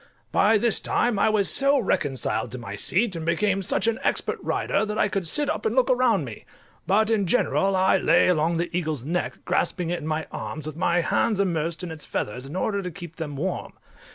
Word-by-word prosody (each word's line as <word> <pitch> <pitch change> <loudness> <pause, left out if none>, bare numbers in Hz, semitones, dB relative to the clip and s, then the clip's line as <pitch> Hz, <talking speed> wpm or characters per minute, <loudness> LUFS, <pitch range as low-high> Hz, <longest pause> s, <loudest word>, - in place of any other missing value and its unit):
By 220 +2 +4
this 230 +1 +3
time 235 -4 0
I - - +4
was 210 -3 +1
so 275 0 +3
reconciled 140 - -1
to - - -4
my 105 -5 -7
seat, 190 - +1
and 165 - -4
become 195 +4 +1
such 190 - 0
an 230 +2 +1
expert - - 0
rider, 200 - 0
that 210 0 -3
I - - +3
could 195 -3 -2
sit 295 - +1
up 310 - -2
and 445 - 0
look - - +3
around - - +2
me; - - -9 0.4
but 215 +3 +3
in 205 -4 +1
general 195 -2 +2
I 190 0 +4
lay 170 -2 +4
along 165 -1 +2
the 170 +1 -3
eagle's 155 -7 -2
neck, 175 +4 -3
grasping 175 -3 0
it 175 - -1
in 155 - -7
my 155 0 -1
arms, 155 -2 -6
with 155 -1 -6
my 175 +1 +1
hands 205 +4 +1
immersed 170 -3 -1
in 175 - -5
its 160 -1 -7
feathers, 125 +5 -4
in 145 - -8
order 200 +2 -1
to 180 - -4
keep 170 -1 -10
them 150 -3 -5
warm. 185 +7 -3
180 Hz, 220 wpm, -24 LUFS, 160-210 Hz, 0.4 s, By